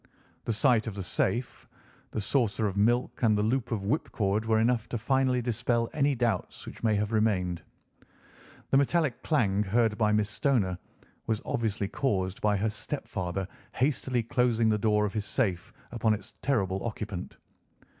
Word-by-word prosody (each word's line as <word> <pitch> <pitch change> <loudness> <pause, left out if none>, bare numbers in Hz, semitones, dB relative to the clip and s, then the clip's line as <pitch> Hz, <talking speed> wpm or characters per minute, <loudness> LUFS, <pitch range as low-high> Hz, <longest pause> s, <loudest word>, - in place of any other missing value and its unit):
The - - 0
sight 115 +1 +3
of 105 - -4
the 100 - -4
safe, 100 +7 -2 0.4
the - - -3
saucer 110 -1 +1
of 100 -2 -1
milk, 120 +5 +1
and 110 -3 +4
the 105 - +1
loop 120 +3 0
of 105 -4 -1
whipcord 105 -4 0
were 110 0 +3
enough 115 0 +1
to 120 - -2
finally 130 +1 +1
dispel 120 0 0
any 140 -1 +2
doubts 115 -6 -1
which - - -10
may 110 -2 +3
have 105 +1 -1
remained. 95 -6 +1 1.1
The 135 - +5
metallic 140 -2 +1
clang 105 -10 +2
heard 105 +2 +1
by 105 -1 +3
Miss 105 -1 +2
Stoner 105 - 0 0.5
was 110 -2 0
obviously 105 -3 -1
caused 95 -6 -1
by 105 -1 +2
her 105 +2 0
stepfather 95 -5 -4 0.3
hastily 130 -2 0
closing 115 -1 +2
the 105 - +2
door 105 -1 +2
of 100 - -3
his 105 -2 -2
safe 100 -7 -1 0.2
upon 115 -2 +2
its 105 - -11
terrible 95 -8 0
occupant. 105 -5 -5
110 Hz, 165 wpm, -28 LUFS, 100-120 Hz, 1.1 s, The